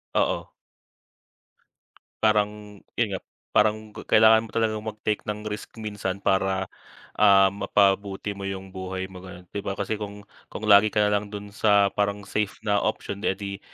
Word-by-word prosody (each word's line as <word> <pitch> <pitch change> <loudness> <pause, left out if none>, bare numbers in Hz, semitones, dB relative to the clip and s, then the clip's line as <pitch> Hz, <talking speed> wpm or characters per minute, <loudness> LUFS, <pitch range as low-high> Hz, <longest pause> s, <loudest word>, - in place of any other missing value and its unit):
Oo. - - +1 1.8
Parang 105 -1 +4 0.5
yun 120 - +2
nga, - - -4 0.4
parang 110 0 +4 0.3
kailangan 110 +1 +6
mo - - -12
talagang 110 -2 0
mag-take 105 -1 -3
ng 105 0 -2
risk 105 0 -5
minsan, 105 -3 -4
para, 95 -1 +1 0.5
ah, 100 -2 +6
mapabuti 100 0 +1
mo 100 - -8
yung 95 -1 -5
buhay 95 0 -5
mo 95 -1 -12
ganun, 90 -1 -11
'di 100 - -3
ba? 100 - -2
Kasi 100 +2 -1
kung 105 0 -7 0.3
kung 110 - -5
lagi 105 +1 +7
ka 105 - +1
nalang 105 0 -1
dun 105 0 -7
sa 100 -2 +4
parang 100 0 0
safe 105 0 -1
na 100 -1 +3
option, 100 -1 -3
eh - - +2
'di 100 0 -6
100 Hz, 155 wpm, -25 LUFS, 95-105 Hz, 1.8 s, lagi